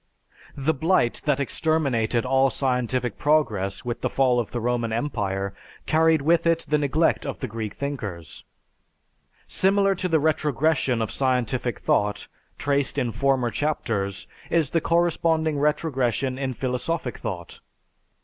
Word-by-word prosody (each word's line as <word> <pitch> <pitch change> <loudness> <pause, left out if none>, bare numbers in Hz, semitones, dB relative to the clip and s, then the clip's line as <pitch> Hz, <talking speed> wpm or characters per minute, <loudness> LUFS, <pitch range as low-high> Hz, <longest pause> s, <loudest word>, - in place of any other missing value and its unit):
The 145 +3 +1
blight 160 -4 +1
that 145 -2 +2
exterminated 135 -6 0
all 135 +1 +3
scientific 125 -3 -1
progress, 120 -10 +1
with 120 0 -3
the - - 0
fall 130 -2 +2
of 115 - -2
the 120 - -3
Roman 120 -1 -1
Empire, 100 -6 -2 0.3
carried 160 -1 +3
with 170 +2 +3
it 165 0 +2
the 150 0 +2
neglect 150 +3 +1
of 140 - -4
the - - -4
Greek 110 -3 -5
thinkers. 105 - -5 1.0
Similar 195 +1 +3
to 185 0 -2
the 165 -3 +2
retrogression 150 -4 +1
of 110 - -4
scientific 125 -2 0
thought, 105 0 0 0.3
traced 140 0 0
in 125 -4 0
former 135 -2 +1
chapters, 105 -11 -2 0.2
is 160 -4 +1
the 165 - +1
corresponding 165 -2 +1
retrogression 135 -4 0
in 130 -2 -2
philosophic 125 +2 -3
thought. 90 -4 -6
135 Hz, 135 wpm, -24 LUFS, 120-155 Hz, 1.0 s, all